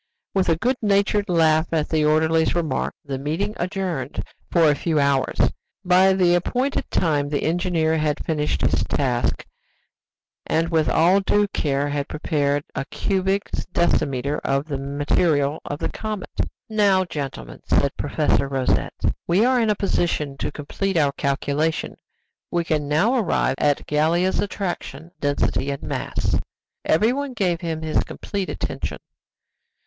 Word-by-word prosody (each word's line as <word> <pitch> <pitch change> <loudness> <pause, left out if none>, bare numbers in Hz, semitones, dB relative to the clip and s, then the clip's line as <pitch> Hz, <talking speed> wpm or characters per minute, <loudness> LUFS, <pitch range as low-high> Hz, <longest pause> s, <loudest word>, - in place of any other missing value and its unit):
With 190 -2 +1
a 165 - +4
good 250 +8 0
natured 200 0 +2
laugh 160 -1 +3
at 160 -2 +1
the 155 -2 +2
orderly's 160 +2 +3
remark, 160 -6 -1
the 135 -2 -4
meeting 165 +9 -2
adjourned 180 -6 -3 0.3
for 165 -2 +4
a 150 - +5
few 160 0 0
hours. 140 -2 +1 0.5
By 185 +1 +5
the 180 -2 +3
appointed 250 +10 0
time 145 -4 +1
the 145 -1 -1
engineer 165 -2 +1
had 150 -1 -1
finished 150 -2 -1
his - - +2
task, 125 -4 0 1.0
and 165 +1 +1
with 160 -2 +2
all 180 +4 +4
due 205 +1 +2
care 145 -5 0
had 145 -1 -2
prepared 145 -2 0
a 135 - -3
cubic 195 +5 0 0.3
decimeter 140 -4 +1
of 135 +1 0
the 140 -4 -4
material 145 +1 +1
of 145 - -4
the - - -2
comet. 215 -3 -5 0.4
"Now, 200 -4 +3
gentlemen," 135 - -6
said - - +2
Professor 140 - +1
Rosette, 135 -2 -1 0.3
"we 185 +7 +4
are 255 -1 +3
in 225 - +2
a 210 - +3
position 170 -7 -1
to - - -3
complete 190 +6 -3
our 145 -3 +3
calculation; 145 +3 -1 0.5
we 175 -1 0
can 155 -3 -1
now 160 - +2
arrive 185 - +1
at 145 -1 +1
Gallia's 165 +5 +1
attraction, 180 -4 -4
density, 140 -1 0
and 140 -1 -4
mass." - - -1 0.5
Everyone 255 - +1
gave 180 -6 0
him 160 -2 -3
his 155 -1 +1
complete 200 -2 -5
attention. - - -4
160 Hz, 145 wpm, -23 LUFS, 145-190 Hz, 1.0 s, a